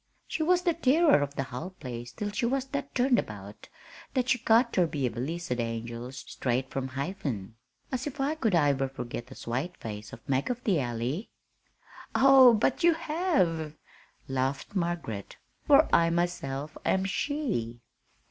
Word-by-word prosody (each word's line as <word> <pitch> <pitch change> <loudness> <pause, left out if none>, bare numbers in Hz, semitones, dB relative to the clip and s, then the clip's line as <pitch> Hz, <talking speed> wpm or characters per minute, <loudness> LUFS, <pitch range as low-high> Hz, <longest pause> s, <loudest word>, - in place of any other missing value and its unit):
She - - -3
was 360 +3 +3
the 345 -2 +3
tirror 310 - +4
of 145 0 -3
the 135 - -1
hull 155 +9 -7
place 120 -1 -6
till 205 +10 -4
she 235 +3 0
was 265 +1 0
that 280 0 -4
turned 250 0 +4
about 105 0 -8 0.5
that 255 -1 +1
she 245 - +3
got 230 +1 +4
ter 180 -3 +3
be 145 -4 -2
a 120 - 0
blissed 135 +1 -3
angel 115 +1 -4
straight 130 -1 -3
from 135 -1 -2
Hiven. 135 - -4 0.4
As 260 +1 -2
if 285 -1 -7
I 275 +3 +1
could 230 - +1
iver 140 -4 +2
forgit 120 -2 -6
th' 135 - -12
swate 135 +10 -3
face 105 -1 -7
of 115 - -12
Mag 135 - 0
of 250 0 -3
the 190 -7 +2
Alley!" 125 - -2 0.9
"Oh, 265 -3 +8
but 240 +9 +1
you 340 -1 +6
have," 300 - 0 0.5
laughed 135 +4 -2
Margaret, 170 - -3 0.3
"for - - +7
I 165 0 +5
myself 155 -4 -2
am 190 0 +1
she." 195 - -2
165 Hz, 165 wpm, -29 LUFS, -, 0.9 s, Oh